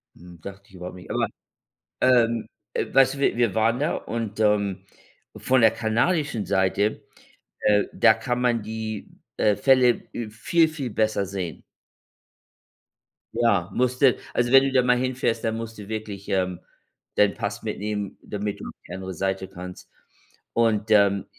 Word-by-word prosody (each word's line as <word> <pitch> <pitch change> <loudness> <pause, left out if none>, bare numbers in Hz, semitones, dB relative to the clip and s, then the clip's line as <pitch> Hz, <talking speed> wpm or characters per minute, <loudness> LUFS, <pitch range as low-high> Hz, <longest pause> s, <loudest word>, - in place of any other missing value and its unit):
Hm. 90 0 -14
Dachte 100 +3 -9
ich 95 - -17
überhaupt 90 0 -8
nicht 90 0 -12
aber - - 0 0.7
ähm, 115 -3 +3 0.3
äh, - - -1
weißt 135 -1 +5
du, - - -9
wir 140 - +1
wir 115 -5 +1
waren 115 +2 +2
da 150 +3 0
und, 110 -1 -5
ähm, 100 -3 +1 0.5
von 130 -1 +2
der 110 -1 +6
kanadischen 115 - 0
Seite, 100 +2 +1 0.6
äh, 105 -1 +3
da - - +5
kann 125 0 -2
man 120 -2 +2
die, 110 -1 -5 0.3
äh, 105 - +3
Fälle, 130 -2 +4
äh, 115 -2 -4
viel 160 +10 +2
viel 150 -5 -5
besser 110 -1 0
sehen. 90 -6 -5 1.7
Ja, 105 -6 +2
musst 125 +1 0
du 135 -3 +5 0.2
also 120 0 +1
wenn 135 0 +8
du 135 - 0
da 130 - +5
mal 125 0 +3
hinfährst, 125 -2 -1
dann 110 0 0
musst 115 0 -6
du 105 -1 -9
wirklich, 105 -2 -6
ähm, 95 -2 0 0.6
deinen 105 -1 +4
Pass - - -4
mitnehmen, 105 -1 -4
damit 105 0 -4
du - - -7
auf - - -9
die 90 - -8
andere 95 0 -6
Seite 95 +2 -2
kannst. 90 -1 -10 0.6
Und, 110 -2 +1
ähm, 100 -2 +4
110 Hz, 165 wpm, -24 LUFS, 100-120 Hz, 1.7 s, wenn